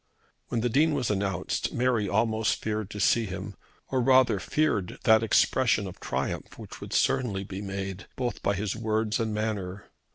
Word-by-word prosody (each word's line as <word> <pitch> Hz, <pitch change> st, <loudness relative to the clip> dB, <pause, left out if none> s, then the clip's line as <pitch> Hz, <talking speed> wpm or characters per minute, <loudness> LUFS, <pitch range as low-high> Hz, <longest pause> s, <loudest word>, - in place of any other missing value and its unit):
When 115 Hz, -, -1 dB
the 120 Hz, -, +1 dB
Dean 150 Hz, +5 st, +3 dB
was 125 Hz, -6 st, 0 dB
announced 100 Hz, -2 st, -1 dB
Mary 120 Hz, -5 st, +1 dB
almost 110 Hz, +2 st, +1 dB
feared 110 Hz, -2 st, -3 dB
to 105 Hz, -, -7 dB
see 115 Hz, +3 st, +3 dB
him, 95 Hz, +2 st, -6 dB, 0.4 s
or 130 Hz, -1 st, +1 dB
rather 130 Hz, -4 st, +4 dB
feared 125 Hz, -8 st, 0 dB
that 110 Hz, 0 st, +6 dB
expression 115 Hz, -1 st, +3 dB
of 95 Hz, -, -8 dB
triumph -, -, -3 dB
which -, -, -10 dB
would -, -, -8 dB
certainly 125 Hz, -8 st, +1 dB
be 95 Hz, 0 st, -6 dB
made 95 Hz, -1 st, -5 dB
both 125 Hz, -2 st, -3 dB
by 100 Hz, -, +1 dB
his 100 Hz, 0 st, -2 dB
words 110 Hz, 0 st, 0 dB
and 110 Hz, -1 st, -1 dB
manner. 105 Hz, -3 st, -3 dB
110 Hz, 170 wpm, -27 LUFS, 100-120 Hz, 0.4 s, that